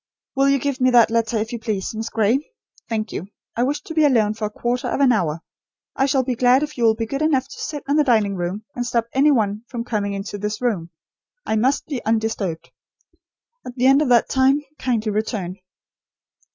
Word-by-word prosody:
"Will 275 Hz, +1 st, +3 dB
you 275 Hz, -, +4 dB
give 275 Hz, 0 st, -3 dB
me 255 Hz, -, +5 dB
that 240 Hz, -3 st, +5 dB
letter, 230 Hz, 0 st, +1 dB
if 220 Hz, +2 st, -3 dB
you 235 Hz, -, -3 dB
please, 215 Hz, -4 st, -3 dB
Miss 225 Hz, +1 st, -4 dB
Gray? 225 Hz, +4 st, +2 dB, 0.5 s
Thank 220 Hz, -1 st, -2 dB
you. 185 Hz, -, -5 dB, 0.3 s
I 235 Hz, -, -1 dB
wish 280 Hz, +4 st, 0 dB
to 325 Hz, -, -7 dB
be 315 Hz, -1 st, +3 dB
alone 225 Hz, -7 st, +3 dB
for 215 Hz, 0 st, -4 dB
a -, -, -2 dB
quarter 240 Hz, +3 st, -2 dB
of -, -, -2 dB
an 275 Hz, -2 st, +5 dB
hour. 170 Hz, -8 st, 0 dB, 0.5 s
I 270 Hz, -, +2 dB
shall 265 Hz, -1 st, +2 dB
be 255 Hz, -, -1 dB
glad 250 Hz, +3 st, +4 dB
if 300 Hz, 0 st, -5 dB
you 240 Hz, -, +1 dB
will 220 Hz, -1 st, +4 dB
be 225 Hz, -, -2 dB
good 275 Hz, +6 st, -4 dB
enough 275 Hz, -4 st, +2 dB
to 280 Hz, -, -12 dB
sit 295 Hz, -2 st, -5 dB
in 285 Hz, +2 st, +2 dB
the 300 Hz, -, +5 dB
dining 220 Hz, -7 st, +2 dB
room, 180 Hz, +4 st, -4 dB
and 245 Hz, -, -3 dB
stop 235 Hz, -1 st, 0 dB
any 275 Hz, +3 st, +4 dB
one 215 Hz, -6 st, +1 dB
from 240 Hz, -3 st, -5 dB
coming 205 Hz, -4 st, -2 dB
into 200 Hz, +1 st, -5 dB
this 210 Hz, +1 st, -3 dB
room. 205 Hz, -10 st, -1 dB, 0.6 s
I -, -, 0 dB
must 255 Hz, +6 st, +1 dB
be 275 Hz, -5 st, -5 dB
undisturbed. 220 Hz, -6 st, -2 dB, 0.9 s
At 245 Hz, -, -8 dB
the 250 Hz, 0 st, 0 dB
end 270 Hz, +2 st, +6 dB
of 295 Hz, -, +1 dB
that 240 Hz, -2 st, +4 dB
time 270 Hz, +2 st, +2 dB, 0.2 s
kindly 230 Hz, -4 st, 0 dB
return." 205 Hz, -4 st, -3 dB
235 Hz, 220 wpm, -21 LUFS, 215-265 Hz, 0.9 s, end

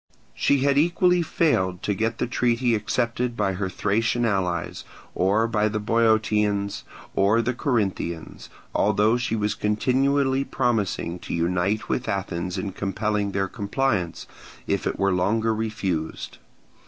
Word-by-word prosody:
She 140 Hz, -2 st, +2 dB
had 140 Hz, 0 st, +3 dB
equally 175 Hz, +2 st, +3 dB
failed 95 Hz, -, 0 dB
to 105 Hz, -, 0 dB
get 115 Hz, +3 st, -1 dB
the -, -, 0 dB
treaty 120 Hz, 0 st, +1 dB
accepted 120 Hz, +3 st, -1 dB
by 95 Hz, -, +1 dB
her 95 Hz, 0 st, -2 dB
Thracian 115 Hz, +5 st, 0 dB
allies, 90 Hz, -5 st, -1 dB, 0.3 s
or 105 Hz, +5 st, +2 dB
by 110 Hz, -2 st, +1 dB
the 110 Hz, 0 st, -2 dB
Boeotians 105 Hz, -2 st, +1 dB, 0.3 s
or 100 Hz, +4 st, +3 dB
the 120 Hz, +2 st, 0 dB
Corinthians; 100 Hz, -, -2 dB, 0.2 s
although 105 Hz, +2 st, +3 dB
she 120 Hz, -2 st, -1 dB
was 105 Hz, -1 st, 0 dB
continually 135 Hz, +6 st, +1 dB
promising 105 Hz, -10 st, -1 dB
to -, -, -5 dB
unite 90 Hz, +6 st, 0 dB
with 125 Hz, -, -2 dB
Athens 90 Hz, -1 st, -3 dB
in 95 Hz, +1 st, -3 dB
compelling 100 Hz, +1 st, -1 dB
their 95 Hz, 0 st, 0 dB
compliance, 100 Hz, -4 st, -1 dB, 0.4 s
if -, -, -1 dB
it -, -, -2 dB
were 100 Hz, -1 st, +2 dB
longer 110 Hz, +5 st, +1 dB
refused. 100 Hz, -7 st, -3 dB
105 Hz, 135 wpm, -24 LUFS, 95-120 Hz, 0.4 s, had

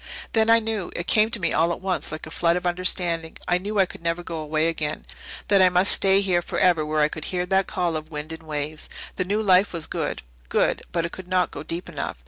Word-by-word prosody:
Then 225 Hz, 0 st, +3 dB
I 230 Hz, -, +8 dB
knew 220 Hz, -4 st, -2 dB
it 175 Hz, -, -3 dB
came 215 Hz, +2 st, +4 dB
to 230 Hz, -, -1 dB
me 170 Hz, -3 st, 0 dB
all 165 Hz, +2 st, +2 dB
at -, -, -3 dB
once, 190 Hz, -4 st, -1 dB
like 155 Hz, 0 st, -6 dB
a 155 Hz, -, -10 dB
flood 170 Hz, +1 st, +2 dB
of 180 Hz, -, -3 dB
understanding. 175 Hz, -2 st, 0 dB
I 175 Hz, 0 st, +2 dB
knew 205 Hz, +3 st, -4 dB
I 190 Hz, -, +5 dB
could 175 Hz, -, -11 dB
never 170 Hz, +1 st, -1 dB
go 165 Hz, -1 st, -5 dB
away 155 Hz, +1 st, 0 dB
again 155 Hz, -2 st, -3 dB, 0.4 s
that 200 Hz, -2 st, +5 dB
I 185 Hz, -, +7 dB
must 180 Hz, +2 st, +3 dB
stay 195 Hz, 0 st, +4 dB
here 180 Hz, -3 st, +1 dB
forever 175 Hz, -2 st, +2 dB
where 155 Hz, 0 st, 0 dB
I 150 Hz, -, +5 dB
could 155 Hz, 0 st, -6 dB
hear 180 Hz, -1 st, -1 dB
that 190 Hz, +1 st, +1 dB
call 175 Hz, -3 st, -1 dB
of 155 Hz, 0 st, -5 dB
wind 150 Hz, 0 st, -6 dB
and 160 Hz, -, -9 dB
waves. 155 Hz, -1 st, -3 dB, 0.3 s
The 185 Hz, -, 0 dB
new 210 Hz, +4 st, 0 dB
life 190 Hz, 0 st, +4 dB
was 165 Hz, -2 st, -3 dB
good -, -, -3 dB, 0.3 s
good -, -, +1 dB
but 170 Hz, -1 st, 0 dB
it 170 Hz, -, -5 dB
could 185 Hz, -1 st, -9 dB
not 180 Hz, -1 st, +1 dB
go -, -, -7 dB
deep 165 Hz, +3 st, -5 dB
enough. -, -, -5 dB
175 Hz, 255 wpm, -24 LUFS, 160-190 Hz, 0.4 s, I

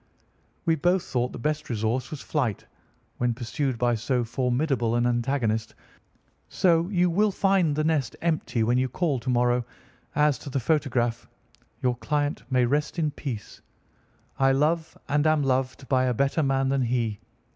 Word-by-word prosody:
"We 165 Hz, -, +3 dB
both 175 Hz, +4 st, +2 dB
thought 125 Hz, 0 st, -1 dB
the -, -, -7 dB
best 150 Hz, +5 st, -2 dB
resource 115 Hz, +2 st, -1 dB
was 150 Hz, -, -7 dB
flight, 125 Hz, -, -2 dB, 0.5 s
when 120 Hz, -1 st, +1 dB
pursued 125 Hz, +2 st, -2 dB
by 120 Hz, +1 st, +2 dB
so 120 Hz, +2 st, 0 dB
formidable 125 Hz, 0 st, 0 dB
an 120 Hz, 0 st, +2 dB
antagonist; 120 Hz, -2 st, 0 dB, 0.7 s
so 170 Hz, -1 st, +2 dB
you 180 Hz, -3 st, +2 dB
will 205 Hz, +5 st, +2 dB
find 190 Hz, -6 st, +2 dB
the 155 Hz, -, 0 dB
nest 150 Hz, -6 st, 0 dB
empty 155 Hz, -8 st, 0 dB
when 120 Hz, +3 st, +2 dB
you 130 Hz, 0 st, 0 dB
call 150 Hz, -6 st, 0 dB
to 130 Hz, -, -5 dB
morrow. 120 Hz, 0 st, +2 dB, 0.5 s
As 150 Hz, -2 st, +3 dB
to -, -, -8 dB
the 135 Hz, -, -1 dB
photograph, 120 Hz, -4 st, 0 dB, 0.5 s
your 125 Hz, -1 st, +2 dB
client 145 Hz, +3 st, -1 dB
may 125 Hz, -1 st, +3 dB
rest 145 Hz, +7 st, 0 dB
in 155 Hz, -3 st, +1 dB
peace. 120 Hz, -8 st, -7 dB, 0.8 s
I 135 Hz, 0 st, +4 dB
love 155 Hz, +4 st, 0 dB
and 145 Hz, +2 st, +2 dB
am 155 Hz, -2 st, +3 dB
loved 130 Hz, 0 st, -1 dB
by 130 Hz, -1 st, +2 dB
a 125 Hz, -1 st, 0 dB
better 140 Hz, +6 st, +1 dB
man 135 Hz, -2 st, +1 dB
than 135 Hz, 0 st, +1 dB
he. 115 Hz, -4 st, -1 dB
135 Hz, 165 wpm, -26 LUFS, 120-150 Hz, 0.8 s, I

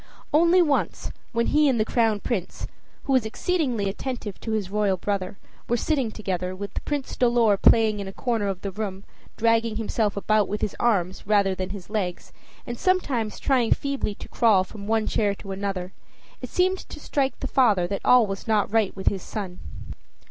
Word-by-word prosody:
Only 340 Hz, +4 st, +5 dB
once, 295 Hz, -4 st, -1 dB, 0.2 s
when 235 Hz, 0 st, +1 dB
he 300 Hz, -1 st, +4 dB
and 245 Hz, -4 st, +1 dB
the 215 Hz, -, +2 dB
Crown 220 Hz, -3 st, +1 dB
Prince, 200 Hz, -8 st, -3 dB, 0.4 s
who 270 Hz, -, 0 dB
was 260 Hz, -3 st, +4 dB
exceedingly 245 Hz, -, -1 dB
attentive 215 Hz, 0 st, -5 dB
to 225 Hz, -, -4 dB
his 200 Hz, -4 st, -2 dB
royal 205 Hz, -2 st, +1 dB
brother, 195 Hz, 0 st, -3 dB, 0.3 s
were 240 Hz, -, +2 dB
sitting 270 Hz, -2 st, 0 dB
together, 185 Hz, -4 st, -3 dB
with 200 Hz, 0 st, -6 dB
Prince 290 Hz, -3 st, -3 dB
Dolor 235 Hz, -4 st, +3 dB
playing 215 Hz, +1 st, +4 dB
in 200 Hz, -, -5 dB
a -, -, -5 dB
corner 225 Hz, -1 st, -1 dB
of 195 Hz, -2 st, -3 dB
the 200 Hz, -, -4 dB
room, 195 Hz, -1 st, -5 dB, 0.3 s
dragging 230 Hz, 0 st, +2 dB
himself 215 Hz, -2 st, -1 dB
about 210 Hz, 0 st, +2 dB
with 210 Hz, -, -3 dB
his 205 Hz, -, -2 dB
arms 190 Hz, -5 st, 0 dB
rather 200 Hz, -2 st, +3 dB
than 185 Hz, 0 st, -4 dB
his 195 Hz, -2 st, -8 dB
legs, 200 Hz, -5 st, -3 dB, 0.3 s
and 240 Hz, -1 st, -6 dB
sometimes 275 Hz, -, 0 dB
trying 250 Hz, -4 st, +3 dB
feebly 275 Hz, -7 st, -3 dB
to -, -, -10 dB
crawl 215 Hz, -6 st, +3 dB
from 200 Hz, +1 st, -10 dB
one 220 Hz, 0 st, +1 dB
chair 205 Hz, -2 st, +1 dB
to 195 Hz, 0 st, -9 dB
another, 190 Hz, -2 st, -4 dB, 0.5 s
it -, -, -6 dB
seemed 370 Hz, +1 st, +1 dB
to -, -, -10 dB
strike 270 Hz, -2 st, -1 dB
the -, -, -4 dB
father 230 Hz, -10 st, +3 dB
that 195 Hz, +2 st, -3 dB
all 250 Hz, -2 st, +6 dB
was 195 Hz, +1 st, -6 dB
not 215 Hz, -1 st, +1 dB
right 220 Hz, -4 st, +2 dB
with 190 Hz, -, -7 dB
his 195 Hz, -2 st, +2 dB
son. 190 Hz, -4 st, -6 dB
215 Hz, 190 wpm, -25 LUFS, 195-240 Hz, 0.5 s, all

